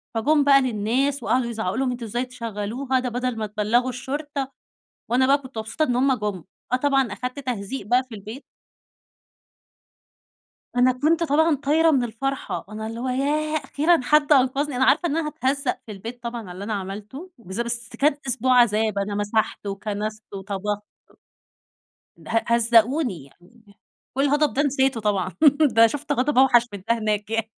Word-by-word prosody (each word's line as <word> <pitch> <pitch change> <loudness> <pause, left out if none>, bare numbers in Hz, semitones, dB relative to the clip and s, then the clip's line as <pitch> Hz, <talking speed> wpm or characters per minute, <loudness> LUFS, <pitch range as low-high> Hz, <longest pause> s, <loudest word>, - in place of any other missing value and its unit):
فجم 290 +6 +3
بقى 275 -1 +6
للناس 255 +3 0
وقعدوا 250 -1 +1
يزعقوا 220 -2 -3
لهم 260 -1 0
"أنتم 240 -1 -5
إزاي 240 +4 -2
تشغلوها؟ 245 +2 -3
ده 250 -1 -2
بدل 245 -1 -2
ما 215 - -2
تبلغوا 215 +5 +1
الشرطة." 275 +2 -4 0.6
وأنا 260 +2 +3
بقى 280 +1 +5
كنت 260 -3 -12
مبسوطة 220 +8 -2
إن 245 - -1
هُم 265 +1 +3
جُم، 210 -6 -3 0.3
آه، - - +6
طبعًا 270 -4 +1
أخدت 250 +4 -5
تهزيق 245 -3 -4
بقى 250 +2 +3
في 250 -3 -11
البيت. 215 +7 -9 2.3
أنا 250 +1 +5
كنت 310 +6 +1
طبعًا 320 +2 +3
طايرة 305 +4 +3
من 265 -5 +2
الفرحة، 265 +4 -4
أنا 215 +1 -6
اللي 225 +1 -6
هو 255 - -2
ياه! 300 +4 0
أخيرًا 315 +3 +2
حد 300 +2 +3
أنقذني، 270 0 +2
أنا 260 - +3
عارفة 345 +6 +3
إن 305 - -1
أنا 325 -2 -1
هاتهزق 280 -2 -1
في 215 - -7
البيت 230 +5 -8
طبعًا 235 0 -4
على 185 -5 -9
اللي 185 +3 -7
أنا 220 - -4
عملته 210 - -7
بالذا 190 +2 -4
بس 235 0 -4
كانت 285 +1 +1
أسبوع 255 0 +2
عذاب، 215 -2 +2
أنا 205 +1 -2
مسحت 205 0 -1
وكنست 210 +2 -4
وطبخت. 200 +1 -3 1.3
ده - - -13
ه 225 0 +1
هَزَّقوني 235 - +2
يعني، 200 - -22 0.4
والغضب 290 +1 +2
ده 285 - +2
نسيته 270 -4 +1
طبعًا، 200 -3 -1 0.4
ده 225 +1 +7
شُفت 290 +5 -3
غضب 270 0 +1
أوحش 240 -3 +5
من 200 -2 -8
ده 230 0 +2
هناك 210 -1 -2
يعني. 225 0 -1
245 Hz, 170 wpm, -23 LUFS, 215-275 Hz, 2.3 s, ده